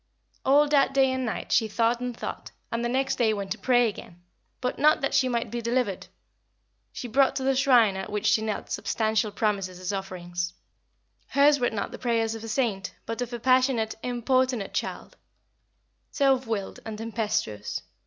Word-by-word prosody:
All 290 Hz, +3 st, +5 dB
that 280 Hz, -2 st, +3 dB
day 265 Hz, -1 st, +4 dB
and 260 Hz, -1 st, -2 dB
night 220 Hz, -, -4 dB
she 225 Hz, -, +3 dB
thought 230 Hz, +2 st, +1 dB
and 250 Hz, -1 st, -4 dB
thought, -, -, -6 dB, 0.2 s
and 230 Hz, +1 st, -1 dB
the 240 Hz, -, 0 dB
next 265 Hz, +2 st, 0 dB
day 220 Hz, -3 st, +2 dB
went 200 Hz, -1 st, -5 dB
to 215 Hz, -, -2 dB
pray 245 Hz, +1 st, +3 dB
again 175 Hz, -4 st, -8 dB, 0.4 s
but 250 Hz, 0 st, -3 dB
not 305 Hz, +1 st, +5 dB
that 275 Hz, -, -1 dB
she 260 Hz, -, +3 dB
might 235 Hz, -1 st, -2 dB
be 240 Hz, 0 st, -3 dB
delivered. 235 Hz, -4 st, -1 dB, 0.8 s
She 245 Hz, -, -6 dB
brought 265 Hz, +4 st, +3 dB
to 265 Hz, -, -2 dB
the 270 Hz, 0 st, +2 dB
shrine 250 Hz, -7 st, +4 dB
at 190 Hz, +2 st, -5 dB
which 210 Hz, -1 st, -2 dB
she 220 Hz, -, +4 dB
knelt 215 Hz, -1 st, -4 dB
substantial 220 Hz, -1 st, 0 dB
promises 200 Hz, -3 st, -1 dB
as 185 Hz, +2 st, -3 dB
offerings. 180 Hz, -2 st, -4 dB, 0.7 s
Hers 285 Hz, +1 st, +4 dB
were 245 Hz, -, +2 dB
not 210 Hz, -3 st, -4 dB
the -, -, -8 dB
prayers 230 Hz, -2 st, 0 dB
of 225 Hz, 0 st, -7 dB
a -, -, -6 dB
saint, 215 Hz, -5 st, -1 dB
but 230 Hz, +2 st, -4 dB
of 245 Hz, -1 st, -3 dB
a 240 Hz, -, -4 dB
passionate, 255 Hz, -2 st, +2 dB
importunate 250 Hz, -2 st, 0 dB
child, -, -, -4 dB, 0.9 s
self 270 Hz, -3 st, +2 dB
willed 210 Hz, -4 st, -3 dB
and 220 Hz, -1 st, -6 dB
tempestuous. 215 Hz, -, -2 dB
230 Hz, 185 wpm, -26 LUFS, 210-255 Hz, 0.9 s, All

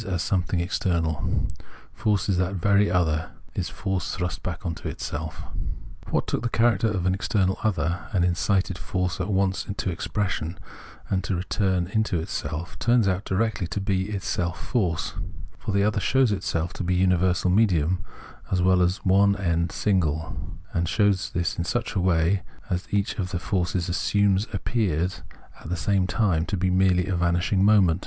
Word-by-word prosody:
as 90 Hz, -3 st, -1 dB
something 90 Hz, -2 st, 0 dB
external; 85 Hz, -3 st, 0 dB, 0.5 s
force 105 Hz, -2 st, 0 dB
is 95 Hz, -3 st, +2 dB
that 90 Hz, +2 st, 0 dB
very 100 Hz, +2 st, +3 dB
other, 80 Hz, -3 st, +1 dB, 0.2 s
is -, -, -2 dB
force 95 Hz, -1 st, -2 dB
thrust 90 Hz, -3 st, -3 dB
back 90 Hz, +2 st, -5 dB
into 80 Hz, -4 st, -4 dB
itself. 75 Hz, +2 st, -5 dB, 0.7 s
What -, -, +1 dB
took -, -, -1 dB
the 120 Hz, -, -1 dB
character 115 Hz, -2 st, +3 dB
of 95 Hz, -5 st, -1 dB
an 95 Hz, -, +3 dB
external 95 Hz, -1 st, 0 dB
other, 90 Hz, -4 st, 0 dB
and 90 Hz, -3 st, +2 dB
incited 95 Hz, +1 st, +1 dB
force 90 Hz, -1 st, -2 dB
at 90 Hz, -, -2 dB
once 95 Hz, -1 st, +1 dB
to 95 Hz, -, -1 dB
expression 90 Hz, -1 st, -2 dB, 0.5 s
and 95 Hz, -1 st, 0 dB
to 95 Hz, -, 0 dB
return 95 Hz, 0 st, 0 dB
into 105 Hz, -7 st, +1 dB
self, 80 Hz, +4 st, -5 dB
turns 120 Hz, -3 st, +3 dB
out 95 Hz, +1 st, 0 dB
directly 100 Hz, -2 st, 0 dB
to 95 Hz, -, -3 dB
be 95 Hz, 0 st, 0 dB
itself 90 Hz, -3 st, -2 dB
force: 90 Hz, -10 st, -1 dB, 0.5 s
for -, -, -3 dB
the 100 Hz, 0 st, +2 dB
other 105 Hz, 0 st, +2 dB
shows 130 Hz, +2 st, +3 dB
itself 85 Hz, -4 st, -1 dB
to -, -, -4 dB
be 90 Hz, +1 st, +2 dB
luiiversal 90 Hz, 0 st, +2 dB
medium 90 Hz, -5 st, +2 dB, 0.5 s
as 90 Hz, -, +2 dB
well 90 Hz, 0 st, +4 dB
as 90 Hz, +3 st, 0 dB
one 100 Hz, +1 st, +5 dB
and 85 Hz, -4 st, 0 dB
single, 85 Hz, -6 st, 0 dB, 0.4 s
and 85 Hz, -1 st, 0 dB
shows 100 Hz, -2 st, +2 dB
this 85 Hz, -1 st, -2 dB
in -, -, +1 dB
such 120 Hz, +8 st, -2 dB
a 100 Hz, -, 0 dB
way 90 Hz, +1 st, +2 dB, 0.3 s
that 90 Hz, +1 st, -2 dB
each 105 Hz, +2 st, 0 dB
of 90 Hz, -2 st, -1 dB
the 90 Hz, -, -2 dB
forms 90 Hz, 0 st, -1 dB
assumed 100 Hz, +3 st, +2 dB
appears 90 Hz, -4 st, -1 dB, 0.4 s
at -, -, -9 dB
the 90 Hz, -, -1 dB
same 95 Hz, +1 st, +1 dB
time 95 Hz, -7 st, +1 dB
to 100 Hz, -, -1 dB
be 95 Hz, +1 st, +1 dB
merely 90 Hz, -1 st, +3 dB
a 95 Hz, -2 st, -1 dB
vanishing 85 Hz, +3 st, +2 dB
moment. 95 Hz, -5 st, +5 dB
95 Hz, 170 wpm, -25 LUFS, 85-100 Hz, 0.7 s, one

